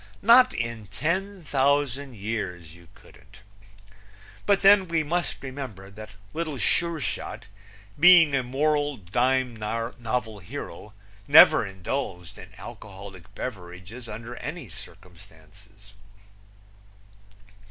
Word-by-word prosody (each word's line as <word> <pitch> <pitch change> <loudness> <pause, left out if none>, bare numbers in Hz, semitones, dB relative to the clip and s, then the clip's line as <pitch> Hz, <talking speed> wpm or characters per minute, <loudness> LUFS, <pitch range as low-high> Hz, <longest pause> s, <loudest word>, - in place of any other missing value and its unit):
Not 245 +4 +7
in 115 -2 -4
ten 185 - -3
thousand 140 -2 0
years, 95 -6 -5
you 85 0 -17
couldn't. - - -19 1.1
But 200 -1 +3
then 195 -1 +6
we 165 -1 0
must 170 +1 -3
remember 130 -8 -8
that 110 +1 -11 0.2
Little 155 -3 -3
Sure 170 +5 0
Shot, 140 - -5 0.5
being 175 -3 +7
a 135 - +2
moral 145 +2 0
dime 125 +6 0
novel 115 0 -3
hero, 100 +3 -9 0.3
never - - +8
indulged 95 -2 -5
in - - -11
alcoholic 95 -1 -11
beverages 100 +2 -8
under 115 +3 -8
any - - -7
circumstances. 95 +3 -15
115 Hz, 100 wpm, -25 LUFS, 100-145 Hz, 1.1 s, never